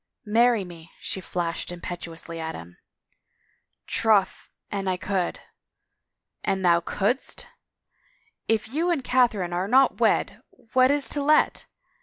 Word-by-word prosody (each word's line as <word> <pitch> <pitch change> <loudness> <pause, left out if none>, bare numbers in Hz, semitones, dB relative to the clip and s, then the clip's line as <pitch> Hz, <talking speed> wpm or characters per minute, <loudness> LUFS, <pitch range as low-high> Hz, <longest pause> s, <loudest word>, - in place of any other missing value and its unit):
" - - -48
Marry 240 -4 +4
me! 170 -2 -12
" - - -29
she 190 - -3
flashed 170 -1 -3
imperiously 170 -1 -7
at 160 0 -4
him. 85 +1 -11 0.6
" - - -44
Troth 210 -4 +2 0.2
an 195 -1 -3
I 185 -1 0
could 185 -1 -2 0.3
— - - -56
" - - -59
" - - -53
An 190 -1 -2
thou 170 -1 +5
couldst! 205 +9 -2 1.0
If 220 -1 +1
you 320 +8 0
and 325 -7 0
Catherine 230 -9 +2
are 180 +2 -1
not 265 +4 +4
wed - - +1 0.3
what 255 0 +5
is 285 0 +2
to 290 - -1
let? 300 +2 +2
195 Hz, 155 wpm, -25 LUFS, 175-250 Hz, 1.0 s, thou